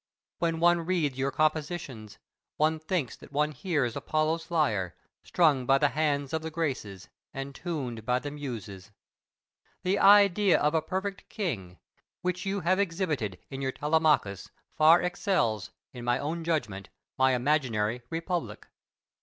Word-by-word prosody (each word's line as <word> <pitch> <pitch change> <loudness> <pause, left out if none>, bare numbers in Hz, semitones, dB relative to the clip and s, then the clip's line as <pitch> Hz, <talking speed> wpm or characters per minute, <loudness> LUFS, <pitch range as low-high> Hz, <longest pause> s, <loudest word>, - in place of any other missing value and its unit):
When 165 -1 0
one 175 0 +4
reads 160 -7 +1
your 135 +1 +1
compositions, 150 - -2 0.4
one 155 +1 +2
thinks 155 - -2
that - - -15
one 150 +2 +1
hears 145 - -1
Apollo's 160 +1 -1
lyre, 110 - 0 0.3
strung 145 -8 +2
by 135 - +5
the 145 +1 +3
hands 145 -2 -1
of 160 - 0
the 160 - -4
Graces, 135 - -4 0.3
and 135 +1 -5
tuned 135 -10 -4
by 125 +2 +1
the 145 +3 -5
Muses. 110 -9 -7 0.9
The 185 +2 +1
idea 200 -1 +6
of 150 +1 +2
a 160 - +2
perfect 190 +4 -4
king, 100 - -4 0.5
which 180 +1 -2
you 195 0 -1
have 185 +4 +2
exhibited 165 - -1
in 135 0 -5
your 135 -1 -1
"Telemachus," 150 - +1 0.3
far 160 +3 +6
excels, 150 - 0 0.2
in 120 -2 -8
my 120 +1 +2
own 160 +5 -3
judgment, 105 - -2 0.3
my 130 -1 +3
imaginary 125 -4 0
"Republic." 165 - -3
150 Hz, 145 wpm, -28 LUFS, 125-170 Hz, 0.9 s, idea